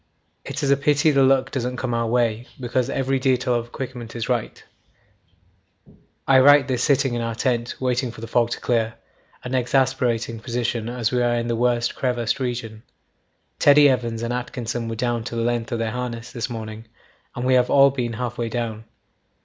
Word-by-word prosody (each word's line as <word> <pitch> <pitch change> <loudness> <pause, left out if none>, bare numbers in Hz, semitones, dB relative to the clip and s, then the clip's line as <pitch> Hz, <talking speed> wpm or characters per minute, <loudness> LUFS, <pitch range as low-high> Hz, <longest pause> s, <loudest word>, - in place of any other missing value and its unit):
'It 140 +2 -5
is 140 - +2
a - - +6
pity 150 +2 +3
the 140 -1 +3
luck 135 0 +3
doesn't 125 -1 -3
come 125 -1 -2
our 115 0 0
way, 120 0 0
because 125 0 -1
every 135 0 0
detail 125 -1 +1
of 120 -1 -1
equipment 120 -2 -7
is 115 -1 -3
right. 120 -3 -2 1.6
'I 135 -1 +6
write 145 0 +6
this 125 -2 -1
sitting 135 -3 +2
in 120 - -2
our 115 -1 -3
tent 120 -1 -1
waiting 125 0 0
for 115 - -11
the 115 - -6
fog 120 0 +1
to - - -4
clear 115 -2 0 0.5
an 125 - -5
exasperating 125 -3 0
position 120 -1 -2
as 120 -2 -1
we 125 -1 +1
are 120 0 +2
in 120 0 -1
the 120 - 0
worst 120 0 +1
crevassed 125 0 -1
region. 120 -4 -4 0.8
Teddy 145 0 +7
Evans 120 -3 0
and 115 +1 -2
Atkinson 120 -1 -4
were 115 - -4
down 120 0 -1
to 120 - -5
the 115 - -1
length 120 -1 -1
of 120 - -1
their 115 -1 -2
harness 120 -1 -5
this 120 0 -4
morning, 110 -1 -7 0.5
and 120 - -3
we 130 - +3
have 125 -1 +3
all 140 0 +6
been 120 -3 -3
half 120 +1 -4
way 115 -1 -1
down. 115 -2 -4
120 Hz, 195 wpm, -22 LUFS, 115-130 Hz, 1.6 s, Teddy